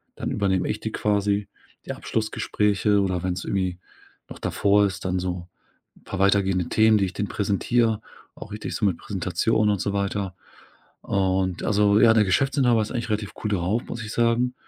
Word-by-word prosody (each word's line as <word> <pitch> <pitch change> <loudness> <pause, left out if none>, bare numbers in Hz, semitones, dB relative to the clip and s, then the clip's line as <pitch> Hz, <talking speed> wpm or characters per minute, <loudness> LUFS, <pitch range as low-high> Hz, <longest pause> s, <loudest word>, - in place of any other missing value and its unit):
dann - - -4
übernehme 95 -3 0
ich 105 - -2
die 110 - -4
quasi, 105 -1 0 0.4
die - - -4
Abschlussgespräche. 105 -2 0
Oder 95 -3 0
wenn's 90 0 -2
irgendwie 95 -2 -1 0.5
noch - - -10
davor 100 0 +2
ist, 95 -1 -7
dann 90 0 0
so 90 -1 -4 0.5
'n - - -24
paar 95 - -6
weitergehende 95 -2 +2
Themen, 110 0 +4
die 100 - +2
ich 95 - -5
denen 105 - -2
präsentiere, 110 +2 +1 0.3
auch - - -11
richtig 105 +1 -5
so 105 - 0
mit 95 -4 +1
Präsentation 100 +3 0
und 100 -2 +1
so 100 - -1
weiter. 100 -1 -2 0.7
Und, 95 -2 0
also 105 0 +3
ja, 115 0 +6
der 110 -1 +4
Geschäftsinhaber 125 +2 +2
ist 105 - -4
eigentlich 120 -2 -3
relativ 105 -1 -2
cool 105 - 0
drauf, 100 +4 0
muss 115 - -5
ich 110 - -6
sagen. 120 +1 +2
100 Hz, 180 wpm, -24 LUFS, 95-110 Hz, 0.7 s, ja